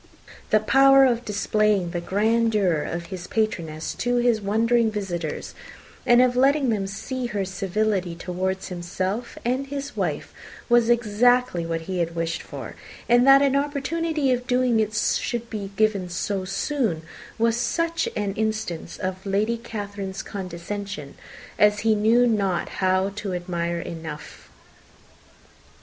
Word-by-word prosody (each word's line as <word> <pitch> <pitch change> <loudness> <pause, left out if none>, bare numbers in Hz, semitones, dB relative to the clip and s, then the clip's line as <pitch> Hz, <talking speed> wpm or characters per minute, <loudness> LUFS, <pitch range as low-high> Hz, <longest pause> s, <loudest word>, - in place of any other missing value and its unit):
The 215 - +5
power 270 +4 +6
of 240 -1 +1
displaying 210 -3 +1
the 175 -1 -3
grandeur 210 -3 +2
of 170 +3 -4
his 180 -1 -6
patroness 165 -8 -2
to 245 0 -1
his 240 -2 +2
wondering 225 +3 +2
visitors, 180 -7 -4 0.5
and 240 +1 +7
of 250 -1 +2
letting 270 +1 +3
them 205 -4 0
see 250 +6 -4
her 205 -4 -2
civility 190 -1 -1
towards 185 +2 -3
himself 185 +6 -4
and 260 +3 0
his 280 0 -5
wife, - - -3 0.3
was 240 -1 +4
exactly 240 -4 +2
what 165 0 -2
he 185 +2 -4
had 170 0 -1
wished 165 0 -2
for; - - -8 0.3
and 245 +2 +5
that 275 +1 +8
an 275 -1 +2
opportunity 290 +1 0
of 245 0 -3
doing 250 -2 +2
it 215 -1 0
should 235 +2 -1
be 205 -3 -4
given 205 -4 +1
so 185 +2 -2
soon 195 - -1 0.3
was 230 0 +2
such 335 +7 0
an 205 -2 -1
instance 215 -6 -3
of 185 0 -4
Lady 210 +4 0
Catherine's 200 -4 -6
condescension 185 -4 -6 0.5
as 210 0 +4
he 225 0 +3
knew 225 +4 +4
not 200 -6 0
how 185 +1 +2
to 200 -3 -3
admire 170 -1 -2
enough. 160 -3 -8
210 Hz, 140 wpm, -24 LUFS, 185-240 Hz, 0.5 s, that